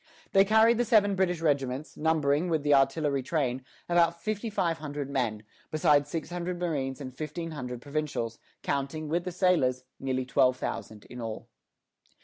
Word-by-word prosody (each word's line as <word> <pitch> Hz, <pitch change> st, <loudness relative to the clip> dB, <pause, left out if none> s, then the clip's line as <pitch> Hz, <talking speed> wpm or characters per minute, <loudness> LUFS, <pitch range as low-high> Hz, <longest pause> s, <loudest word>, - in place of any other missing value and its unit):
They 195 Hz, -, +6 dB
carried 220 Hz, +3 st, +5 dB
the -, -, +4 dB
seven 210 Hz, -4 st, +4 dB
British 180 Hz, -3 st, 0 dB
regiments, 140 Hz, -2 st, -1 dB
numbering, 155 Hz, +1 st, +1 dB
with 160 Hz, -3 st, 0 dB
the 145 Hz, 0 st, +4 dB
artillery 140 Hz, +1 st, +2 dB
train, 130 Hz, -3 st, -1 dB, 0.2 s
about 170 Hz, -1 st, +3 dB
fifty 215 Hz, +4 st, -3 dB
five 170 Hz, -5 st, 0 dB
hundred 145 Hz, -2 st, -5 dB
men, 115 Hz, -6 st, -1 dB, 0.3 s
besides 145 Hz, -2 st, +3 dB
six 165 Hz, +2 st, -4 dB
hundred 175 Hz, 0 st, -3 dB
marines 140 Hz, -7 st, -2 dB
and 130 Hz, -3 st, -7 dB
fifteen 160 Hz, +3 st, -5 dB
hundred 125 Hz, -5 st, -6 dB
provincials; 145 Hz, -6 st, -3 dB, 0.2 s
counting, 140 Hz, +2 st, -2 dB
with 170 Hz, +2 st, 0 dB
the 180 Hz, -, -3 dB
sailors, 160 Hz, -9 st, +2 dB, 0.2 s
nearly 130 Hz, -1 st, -1 dB
twelve 125 Hz, +1 st, +3 dB
thousand 110 Hz, -3 st, -5 dB
in 125 Hz, 0 st, -9 dB
all. 110 Hz, -1 st, -6 dB
150 Hz, 160 wpm, -28 LUFS, 130-170 Hz, 0.3 s, They